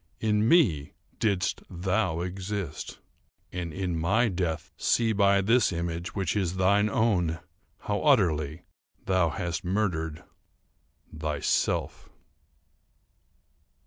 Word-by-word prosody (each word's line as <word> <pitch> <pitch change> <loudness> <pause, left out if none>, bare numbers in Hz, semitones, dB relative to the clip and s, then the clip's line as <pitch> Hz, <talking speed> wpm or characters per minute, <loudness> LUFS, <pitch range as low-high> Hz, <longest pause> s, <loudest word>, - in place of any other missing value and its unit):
In 105 0 +2
me 85 - +3 0.3
didst 100 -4 0
thou 90 -1 -1
exist—and, 90 -2 -6
in 90 -1 -2
my 110 +9 +2
death, 90 -1 -3
see 115 -2 +2
by 100 -1 +4
this 115 +4 +3
image, 85 +1 -4
which 95 -1 -1
is 95 -3 0
thine 100 +3 +3
own, 95 -9 +1 0.4
how 105 0 -2
utterly 85 - +2 0.4
thou 95 -3 +2
hast 85 -1 -3
murdered 90 -5 -1 0.9
thyself." 75 -1 -1
95 Hz, 95 wpm, -27 LUFS, 85-105 Hz, 0.9 s, by